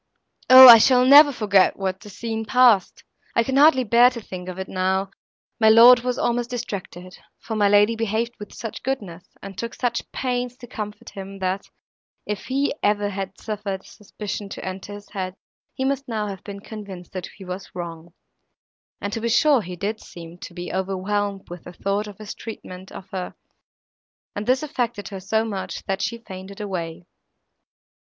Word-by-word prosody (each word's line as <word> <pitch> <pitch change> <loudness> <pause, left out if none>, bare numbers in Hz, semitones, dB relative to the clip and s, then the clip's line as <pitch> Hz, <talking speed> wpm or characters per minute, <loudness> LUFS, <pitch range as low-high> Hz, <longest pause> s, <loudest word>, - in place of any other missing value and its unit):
O! 260 0 +12
I 230 -2 +12
shall 250 +2 +5
never 285 +2 +9
forget 200 -6 +3
what 190 0 -3
a 210 - -11
scene 225 +2 -4
passed—I 235 -1 +2
can 265 +3 -2
hardly 280 -2 +6
bear 235 +2 +6
to 250 -2 -7
think 185 -4 -8
of 180 - -7
it 190 0 -5
now! 190 +1 -1 0.5
My 220 -1 +5
lord 235 +3 +8
was 250 0 -2
almost 240 0 -1
distracted, 185 -7 -7 0.2
for 225 - -6
my 205 -2 +3
lady 205 +2 +4
behaved 225 +1 -1
with 210 - -9
so 225 - -6
much - - -10
goodness, 190 -10 -5
and 195 0 -8
took 230 +4 -5
such 240 -2 -2
pains 250 -1 -3
to 245 - -11
comfort 215 0 -7
him, 195 0 -8
that, 190 +1 -3 0.6
if 210 -1 -4
he 275 +2 0
ever 205 0 +1
had 195 -1 -6
suffered 205 -3 -4
a - - -24
suspicion 210 -1 -7
to - - -8
enter 190 +2 -6
his 205 0 -11
head, 185 -2 -4 0.4
he 265 - -2
must 275 0 -1
now 220 -3 -2
have 195 -2 -7
been 200 -1 -8
convinced 200 -5 -10 0.2
he 195 - -12
was 185 +2 -7
wrong. 170 -1 -7 0.9
And 205 0 -4
to 225 - -3
be 235 - -1
sure 280 +2 +4
he 180 -2 -7
did 205 +5 -3
seem 170 0 -12
to - - -10
be 175 0 -6
overwhelmed 195 +1 -2
with 175 -1 -10
the 180 - -10
thought 200 +3 -2
of 205 - -10
his 215 -1 -8
treatment 190 -4 -9
of 190 - -10
her, 185 -2 -5 1.0
and 205 +1 -5
this 260 +3 +2
affected 240 -8 -3
her 195 -2 -7
so 220 +4 0
much, 200 -4 -5
that 195 0 -2
she 200 +5 -2
fainted 195 -3 -10
away. 175 -4 -5
205 Hz, 185 wpm, -23 LUFS, 190-235 Hz, 1.0 s, O